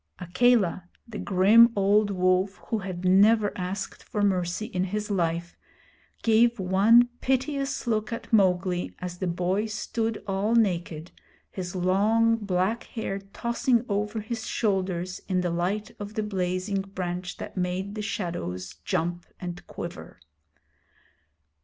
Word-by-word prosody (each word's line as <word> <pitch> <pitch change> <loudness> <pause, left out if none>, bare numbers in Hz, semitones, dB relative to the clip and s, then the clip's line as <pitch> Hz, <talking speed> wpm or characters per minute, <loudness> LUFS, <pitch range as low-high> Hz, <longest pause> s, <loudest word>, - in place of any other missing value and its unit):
Akela, 185 -1 +2 0.2
the 220 -2 -7
grim 210 +5 +6
old 205 +1 +3
wolf 185 +1 +1
who 225 - 0
had 185 -2 -5
never 205 +3 +4
asked 190 +2 -4
for 210 - -2
mercy 185 0 0
in 185 -3 -2
his 210 +2 -3
life, 170 -2 -1 0.7
gave 235 +1 +4
one 205 +6 +5
piteous 275 +1 -1
look 220 -1 -1
at 230 0 -6
Mowgli 185 -3 +2
as 180 -1 -6
the 185 - -1
boy 180 +5 0
stood 220 +1 -3
all 200 +3 0
naked, 175 -6 0 0.4
his 180 -1 -5
long 210 +5 +3
black 200 +2 -1
hair 200 -3 -4
tossing 235 +4 0
over 210 +1 -1
his 220 +1 -5
shoulders 185 -4 -1
in 185 -1 +1
the 175 -1 -1
light 185 +5 -1
of 205 +1 -7
the 215 - 0
blazing 190 0 -1
branch 180 -2 -5
that - - -8
made 185 +2 -2
the 215 - -4
shadows 170 - -4
jump 175 -1 -2
and 175 -1 -7
quiver. - - -8
195 Hz, 135 wpm, -26 LUFS, 180-215 Hz, 0.7 s, grim